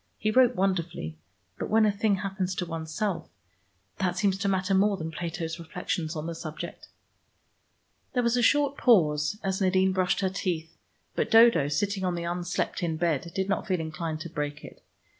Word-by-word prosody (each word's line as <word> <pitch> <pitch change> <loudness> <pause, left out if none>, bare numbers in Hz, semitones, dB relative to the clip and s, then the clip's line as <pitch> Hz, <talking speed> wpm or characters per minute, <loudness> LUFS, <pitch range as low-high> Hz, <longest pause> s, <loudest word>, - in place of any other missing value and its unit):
He 215 - 0
wrote 250 +1 +5
wonderfully, 175 - -1 0.4
but - - -3
when 220 0 +5
a 210 - +4
thing 205 0 +1
happens 190 -1 -3
to 180 - -2
oneself, 165 +2 -3 0.7
that 180 -1 0
seems 195 -1 +2
to 200 - -1
matter 190 0 +1
more 200 +1 +3
than 160 -1 -5
Plato's 165 0 -4
reflections 165 -1 -3
on 155 0 -4
the 170 - -3
subject." 160 -1 -7 1.3
There 250 -2 +1
was 235 0 +2
a 245 - +2
short 285 +3 +3
pause 155 - +3
as 190 0 -1
Nadine 190 0 +3
brushed 185 +1 +1
her 190 - +1
teeth, 170 -4 -3 0.4
but - - -1
Dodo 225 - +6
sitting 195 +6 -1
on 180 -1 0
the 170 - -3
unslept 175 +1 -2
in 165 -2 -1
bed 170 -1 0
did 190 0 0
not 195 - -1
feel 185 -3 +1
inclined 160 0 -4
to 170 - -6
break 150 -1 -4
it. - - -13
180 Hz, 180 wpm, -27 LUFS, 165-200 Hz, 1.3 s, Dodo